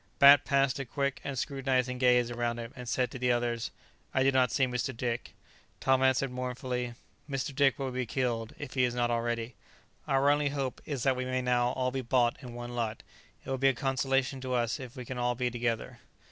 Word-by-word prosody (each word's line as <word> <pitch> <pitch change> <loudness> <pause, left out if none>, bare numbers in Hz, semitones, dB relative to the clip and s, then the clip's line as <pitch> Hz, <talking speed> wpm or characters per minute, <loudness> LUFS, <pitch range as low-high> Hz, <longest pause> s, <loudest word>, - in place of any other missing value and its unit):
Bat 140 +1 +8
passed 135 -1 +2
a 135 - -3
quick 140 +2 -2
and 140 -1 -4
scrutinizing 130 -2 0
gaze 125 -1 +4
around 120 0 -1
him, 115 0 -7
and 125 -2 -7
said 125 +1 0
to 130 - -7
the 125 0 +2
others, 120 -1 0 0.5
"I 130 - +4
do 135 - +4
not 130 -2 +3
see 130 - +3
Mr. 125 0 -3
Dick." 120 0 -3 0.4
Tom 130 0 +3
answered 130 0 +3
mournfully, 125 -1 -3 0.3
"Mr. 135 0 -2
Dick 135 -2 +3
will 135 -2 -3
be 125 -1 -2
killed, 115 -3 -2
if - - -7
he 130 - +2
is 120 -1 +1
not 120 -1 +1
dead - - +1
already. 115 0 -2 0.5
Our 135 +1 +4
only 145 0 +2
hope 135 -2 -3
is 140 -5 -3
that 135 -2 +3
we 130 0 -3
may 130 0 -1
now 125 -1 +2
all 130 -1 0
be 135 +1 -2
bought 120 -1 +2
in 125 -3 -9
one 120 0 -6
lot; 115 -2 -3 0.4
it - - -8
will 135 - -1
be 135 +1 +5
a 135 - 0
consolation 135 0 0
to 130 -1 -2
us 120 -1 0
if 130 -1 -8
we 125 -2 -7
can 130 +1 -5
be - - -2
all 120 0 +1
together." 120 -2 -2
125 Hz, 225 wpm, -30 LUFS, 120-135 Hz, 0.5 s, Bat